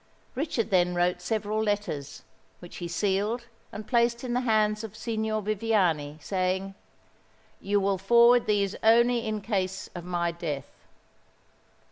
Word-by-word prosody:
Richard 260 -5 -2
then 180 -1 +3
wrote 175 0 +1
several 215 +1 -1
letters, 205 -10 -3 0.3
which 175 - -11
he 175 - -5
sealed 205 +6 -1 0.3
and 215 - -7
placed 235 0 +1
in 245 -1 -3
the 245 - +2
hands 215 -2 +1
of 220 -1 -8
Signor 220 -2 -2
Viviani, 190 -9 0
saying, 190 +3 -2 0.9
"You 205 +1 +1
will 195 -1 0
forward 235 +3 +5
these 200 -2 +1
only 235 +1 +4
in 215 -1 -3
case 190 -3 -2
of 175 - -7
my 175 -1 -1
death." 160 -5 -6
205 Hz, 135 wpm, -27 LUFS, 180-225 Hz, 0.9 s, forward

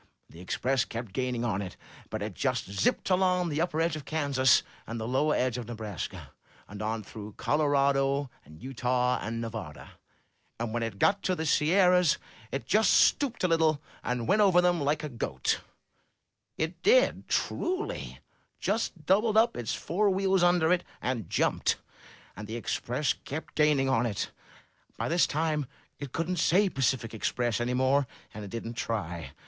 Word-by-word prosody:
The 80 - -13
Express 125 +7 0
kept 115 -4 -6
gaining 125 0 -1
on 100 -4 -1
it. 95 -2 -7 0.3
But 110 -1 -4
it 105 -1 -4
just 130 +3 -1
zipped 100 - 0
along 180 -1 +2
the 150 +1 -1
upper 165 -2 -1
edge 165 -1 +1
of 155 - -6
Kansas 140 -5 +3 0.2
and 115 +1 -4
the 110 - -4
lower 145 +5 +2
edge 125 -1 0
of 120 - -7
Nebraska, 110 -6 -6 0.4
and 105 +1 -8
on 110 0 -2
through 105 0 -9
Colorado 140 -2 +2
and 80 +2 -15
Utah 125 -1 0
and 115 +2 -3
Nevada, 110 -10 -6 0.7
and 115 -1 -3
when 120 - -1
it 115 -3 -3
got 200 - +3
to 185 - 0
the 160 - -3
Sierras 180 +2 +4 0.3
it 135 -4 -3
just 215 - +3
stooped 265 -8 +3
a - - +4
little, 160 -3 +3 0.2
and 125 -2 -2
went 210 +2 +4
over 190 -4 +5
them 175 -2 +2
like 150 +2 0
a - - -2
goat; 70 - -2 1.0
it 160 +2 -3
did, - - +3
truly; 370 +3 -2 0.4
just 200 -6 -2
doubled 210 +5 +3
up 225 +2 +4
its 120 -2 -2
fore 200 +4 +1
wheels 190 -1 +2
under 175 -1 +4
it, 180 -1 0 0.2
and 120 -8 -3
jumped. - - +1 0.6
And 105 +1 -8
the 110 - -5
Express 125 +3 -1
kept 150 +4 -7
gaining 150 -3 +3
on 125 -2 +2
it. 105 -3 -3 0.7
By - - -2
this 170 +1 +3
time 155 -2 -1 0.3
it 140 -3 -6
couldn't 170 +4 -2
say 185 +5 +3
Tacific 130 -6 0
Express' 120 +1 -1
any 125 +1 0
more, 130 +1 +2 0.3
and 105 - -7
it 100 - -7
didn't 115 +2 -5
try. 85 -8 -4
135 Hz, 170 wpm, -29 LUFS, 115-170 Hz, 1.0 s, over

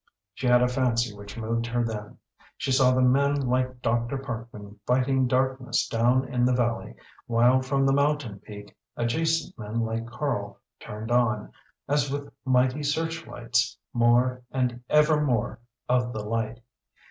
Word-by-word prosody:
She 125 - -3
had 125 0 +5
a - - +4
fancy 120 -3 0
which 100 +2 -10
moved 115 +1 -2
her 120 0 0
then. 105 -3 -5 0.4
She 135 - -2
saw 130 -1 +5
the 130 0 +3
men 140 +3 +3
like 130 -1 -1
Dr. 120 +3 0
Parkman 115 -5 -8
fighting 130 +1 +2
darkness 130 0 0
down 125 +3 +2
in 125 -2 0
the 125 0 +3
valley, 120 -1 -1 0.3
while 120 +2 +4
from 135 +1 +1
the 135 - +3
mountain 140 -7 0
peak 105 0 -11 0.2
adjacent 160 +7 0
men 110 +2 -3
like 115 0 -2
Karl 105 -7 -3 0.2
turned 110 +2 -7
on, 110 -3 +1 0.4
as 145 0 +1
with 140 +1 -5
mighty 130 +2 +2
search 160 +3 -2
lights, 120 +1 -1 0.2
more, 120 +1 +3
and 125 -2 -2
ever 150 0 +4
more, 120 -4 0 0.3
of 125 -1 +1
the 105 -1 -5
light. 115 +1 -2
125 Hz, 155 wpm, -26 LUFS, 115-135 Hz, 0.4 s, had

